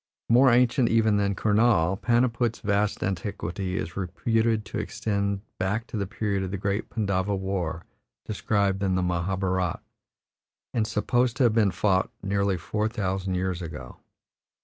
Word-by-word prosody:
More 125 +3 +6
ancient 125 +1 +4
even 110 -2 +3
than 100 -1 +1
Kurnaul, 105 -5 +3
Paniput's 120 +1 +1
vast 105 0 0
antiquity 95 0 -3
is 85 - -4
reputed 110 +4 0
to - - -4
extend 100 -2 -2 0.2
back 100 +5 -1
to 125 - -9
the 100 -2 -1
period 100 -1 -2
of 95 - -3
the 100 - -3
great 100 +2 -2
Pandava 100 -2 0
War 95 -4 -3 0.4
described 100 -2 0
in 95 -2 +1
the 90 - +1
Mahabharat, 90 0 -1 0.9
and 110 -2 +1
supposed 120 +3 +1
to - - +3
have 120 -3 +4
been 110 -3 +4
fought 95 +1 +1
nearly 100 -1 +1
four 105 +6 -1
thousand 95 -4 -2
years 90 -1 -1
ago. 75 -6 -8
100 Hz, 150 wpm, -26 LUFS, 95-110 Hz, 0.9 s, More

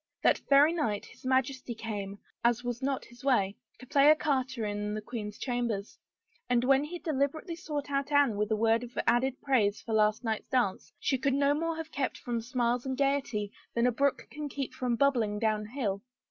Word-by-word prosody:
That - - +4
very 285 +3 +6
night 220 -12 -1
his - - -11
Majesty 260 -2 0
came, 205 -3 -5 0.3
as 240 +1 +2
was 245 0 -3
not 270 0 -1
his 240 +1 -16
way, 205 -8 +2 0.2
to 255 - -12
play 285 +2 +5
ecarte 265 -4 +1
in 210 -1 -2
the - - -2
queen's 210 -2 -6
chambers, 235 -5 -2 0.5
and 245 -1 +3
when 270 +2 +4
he 335 +4 -5
deliberately 310 +2 -1
sought 300 -5 -5
out 275 +1 -1
Anne 285 -6 +4
with 210 +1 -1
a 220 - +2
word 225 +1 +3
of 245 0 -10
added 255 +2 +2
praise 215 -7 +2
for 225 - -5
last 215 +2 +3
night's 220 -2 -2
dance 240 -7 0
she 265 - 0
could 270 +1 +1
no 280 0 +3
more 330 +2 -1
have 320 0 -6
kept 275 -2 -2
from 235 -1 -3
smiles 240 0 0
and 265 -1 -3
gayety 275 -7 0 0.2
than 235 +1 +3
a 250 - +4
brook 280 +3 0
can 295 0 -5
keep 275 -1 -4
from 245 -2 -1
bubbling 235 -6 +2
down 215 -1 0
hill. 215 -5 -2
250 Hz, 200 wpm, -30 LUFS, 220-280 Hz, 0.5 s, very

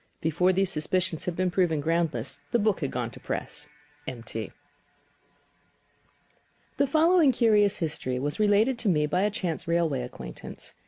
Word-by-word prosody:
Before 170 +4 +2
these 190 0 +1
suspicions 165 +2 -1
had 180 - -2
been 185 0 0
proven 175 -4 +2
groundless, 155 -5 -1
the - - +2
book 215 -3 +1
had 140 - -1
gone 120 -2 -3
to - - -12
press. 150 0 -5 0.4
M. 120 -3 -6
T.] 110 -1 -4
I. - - -11 2.3
The 280 - +3
following 320 0 +5
curious 215 -5 +3
history 150 -6 -2
was 145 +6 -3
related 215 +4 +3
to 230 - +1
me 150 -4 +3
by 180 +5 0
a 205 - +3
chance 180 -7 -4
railway 165 -6 +1
acquaintance. 125 - -8
175 Hz, 160 wpm, -27 LUFS, 150-205 Hz, 2.3 s, following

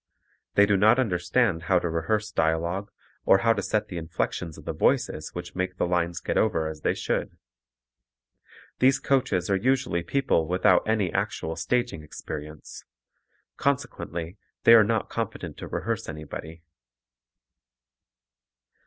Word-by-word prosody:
They 100 - +7
do 100 -1 +2
not 110 +5 +5
understand 90 -4 +1
how 95 - +5
to 85 - 0
rehearse 95 +6 -1
dialogue 85 +5 0 0.3
or - - +6
how 115 - +6
to 100 - -2
set 105 +2 -1
the 90 - -6
inflections 80 0 -3
of - - -13
the - - -3
voices 75 - 0
which 90 0 -6
make 90 0 -2
the - - +1
lines 85 -1 0
get - - -1
over 80 -8 +1
as 80 -1 -7
they - - +1
should. - - -2 1.4
These 130 +1 +5
coaches 130 -12 +1
are - - +4
usually 120 -5 +1
people 85 - +1
without 90 +1 +4
any 105 -5 +1
actual 80 +1 -2
staging 120 -6 -1
experience, 75 0 -8 0.7
consequently 90 -10 -2 0.3
they 115 - +8
are 115 -2 +9
not 110 0 0
competent - - -5
to - - -7
rehearse - - -3
anybody. 80 +1 -8
90 Hz, 140 wpm, -26 LUFS, 80-110 Hz, 1.4 s, are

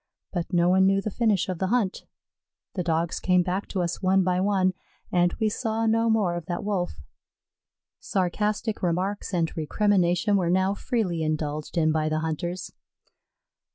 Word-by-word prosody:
But 175 -1 -3
no 175 -1 +3
one 190 +1 +5
knew 195 0 +3
the 210 +2 -3
finish 215 -4 +1
of 185 -3 -4
the 190 - 0
hunt. 215 -3 0 0.7
The 185 - -2
Dogs 165 0 0
came 180 -1 +3
back 185 +3 -2
to 185 -3 -1
us 170 0 -3
one 190 0 +3
by 180 0 +1
one, 190 -2 +2 0.4
and 175 -1 +3
we 220 - +2
saw 225 +1 -1
no 225 +1 +2
more 210 -6 +2
of 175 -2 -5
that 175 +2 -3
Wolf. 195 -4 -1 1.1
Sarcastic 210 +4 -1
remarks 185 +4 -1
and 170 -3 -1
recrimination 185 +3 +2
were 175 -3 0
now 190 +2 +2
freely 200 -6 -1
indulged 155 0 -3
in 155 -1 +3
by 155 0 0
the 155 0 -1
hunters. 170 +3 -3
185 Hz, 165 wpm, -26 LUFS, 170-205 Hz, 1.1 s, one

